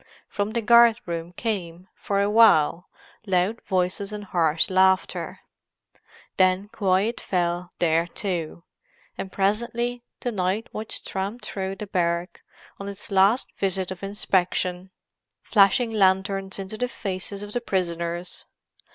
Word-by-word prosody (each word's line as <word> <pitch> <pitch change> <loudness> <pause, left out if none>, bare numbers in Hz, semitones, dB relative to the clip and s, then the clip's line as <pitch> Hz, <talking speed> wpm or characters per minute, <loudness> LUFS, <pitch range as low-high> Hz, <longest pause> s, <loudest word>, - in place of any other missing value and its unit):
From 205 +1 -3
the 235 -1 -1
guard 235 +1 +6
room 170 0 -4
came, 180 -4 -4
for 200 0 -1
a - - +1
while, 190 -6 +5 0.4
loud 190 +4 +1
voices 190 +2 -1
and 210 -1 -6
harsh 165 -4 +2
laughter; 190 0 +1 1.0
then 185 +2 +3
quiet 200 +3 +1
fell 175 -1 -1
there 165 0 +2
too, 170 -3 -4 0.5
and 190 - -6
presently 235 +5 -1 0.2
the 245 - -2
night 195 +1 -1
watch 215 +1 -4
tramped 200 +5 -4
through 190 -1 -4
the 210 - -6
barrack 175 -2 -1 0.4
on 200 0 -5
its 200 +2 -8
last 195 +6 +3
visit 190 -1 -1
of 185 - -7
inspection, 185 -2 -1 0.5
flashing 215 +3 +4
lanterns 190 -1 +1
into 195 +2 -6
the 250 - +1
faces 195 -1 -5
of 205 0 -8
the 245 - -1
prisoners. 175 -4 -3
190 Hz, 130 wpm, -24 LUFS, 180-210 Hz, 1.0 s, guard